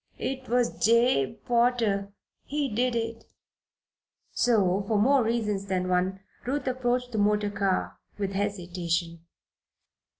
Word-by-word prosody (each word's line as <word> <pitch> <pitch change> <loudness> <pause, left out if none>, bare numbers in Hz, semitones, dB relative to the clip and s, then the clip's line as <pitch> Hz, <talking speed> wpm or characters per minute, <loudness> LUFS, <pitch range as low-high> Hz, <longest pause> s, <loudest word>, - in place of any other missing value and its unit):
"It 260 -2 -4
was 245 0 0
Jabe 230 - +3
Potter 235 -5 +1 0.3
he 290 0 -2
did 245 +2 +1
it." 230 0 -3 1.1
So, 200 -5 +2
for 215 - +1
more 265 +6 +4
reasons 210 -4 -1
than 185 -1 -1
one, 185 +1 0 0.2
Ruth 270 +2 -2
approached 250 -1 -1
the 220 - -2
motor 210 0 +2
car 195 -2 -1 0.2
with 200 -2 -2
hesitation. 175 -4 -2
210 Hz, 120 wpm, -27 LUFS, 195-245 Hz, 1.1 s, more